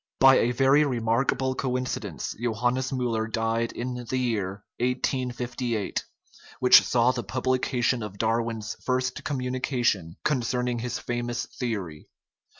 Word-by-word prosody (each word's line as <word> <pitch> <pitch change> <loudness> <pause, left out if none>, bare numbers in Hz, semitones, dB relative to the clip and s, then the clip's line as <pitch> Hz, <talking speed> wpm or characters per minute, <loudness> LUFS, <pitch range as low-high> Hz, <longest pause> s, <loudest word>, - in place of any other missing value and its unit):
By 135 0 +8
a 120 - +2
very 135 +4 +4
remarkable 125 +1 +1
coincidence 130 -1 -3
Johannes 120 +2 0
Miiller 120 -4 -1
died 115 +1 0
in 125 0 -4
the 130 - 0
year 100 -6 -1 0.2
1858, 125 -3 -1 0.5
which 125 - +8
saw 120 0 +3
the 125 -2 -3
publication 130 -1 0
of 105 -2 -6
Darwin's 115 -1 -1
first 130 +1 -1
communi 130 -3 -2
cation 105 - 0
concerning 125 -3 0
his 120 +1 -3
famous 120 0 -3
theory. 100 - -5
125 Hz, 120 wpm, -26 LUFS, 115-130 Hz, 0.5 s, By